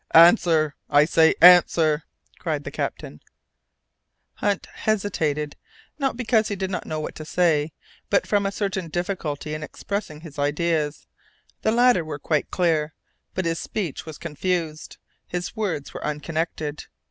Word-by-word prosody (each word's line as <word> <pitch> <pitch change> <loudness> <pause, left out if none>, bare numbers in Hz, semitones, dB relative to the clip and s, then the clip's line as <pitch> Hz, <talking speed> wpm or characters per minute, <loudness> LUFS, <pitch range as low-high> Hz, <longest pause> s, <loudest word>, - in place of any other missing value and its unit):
"Answer, 165 -3 +6 0.2
I 145 0 +5
say 160 0 +4
answer!" 165 -3 +6 0.3
cried - - -2
the - - -6
captain. 75 - -5 1.2
Hunt 205 -1 0
hesitated, 160 -9 -1 0.4
not 270 -4 0
because 225 -3 +2
he 205 - -2
did 190 0 -3
not 185 - -4
know 155 -1 -3
what 155 - -4
to 155 - -8
say, 160 -2 +1 0.4
but 200 - +2
from 200 -1 +1
a - - -2
certain 195 -3 -2
difficulty 155 -4 -3
in 155 - -4
expressing 175 -1 -5
his 155 -4 -10
ideas. 150 0 0 0.6
The 220 - +2
latter 240 -5 +4
were 155 -2 -5
quite 150 0 -1
clear, 160 -4 +1 0.4
but 185 - -1
his 165 0 0
speech 175 -7 -4
was 155 - -7
confused, 165 0 -3 0.3
his 180 +3 -4
words 190 -10 -3
were - - -7
unconnected. 150 0 -3
165 Hz, 145 wpm, -24 LUFS, 150-190 Hz, 1.2 s, Answer